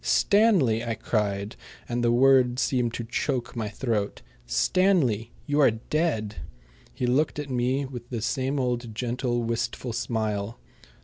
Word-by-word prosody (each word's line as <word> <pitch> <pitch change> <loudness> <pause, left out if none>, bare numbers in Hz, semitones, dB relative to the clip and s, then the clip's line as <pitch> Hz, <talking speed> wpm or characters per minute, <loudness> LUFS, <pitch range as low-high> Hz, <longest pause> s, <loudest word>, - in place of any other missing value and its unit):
"Stanley!" 190 - +3
I 115 -1 -2
cried, 105 -1 -2 0.3
and 120 0 -1
the 120 - +3
words 130 0 +4
seemed 125 -3 +1
to 120 - -3
choke 125 +1 -2
my 110 -3 -2
throat 105 -2 -2 0.2
"Stanley, 120 - +2
you 145 0 0
are 140 - +7
dead." 115 - -2 0.5
He 125 - -3
looked 135 +6 +1
at 145 -2 -5
me 130 +3 0
with 125 -2 -8
the 115 -4 -4
same 130 +4 -1
old 120 -3 -2
gentle, 120 0 -1
wistful 115 +1 -2
smile. 110 -2 -2
120 Hz, 140 wpm, -26 LUFS, 115-135 Hz, 0.5 s, are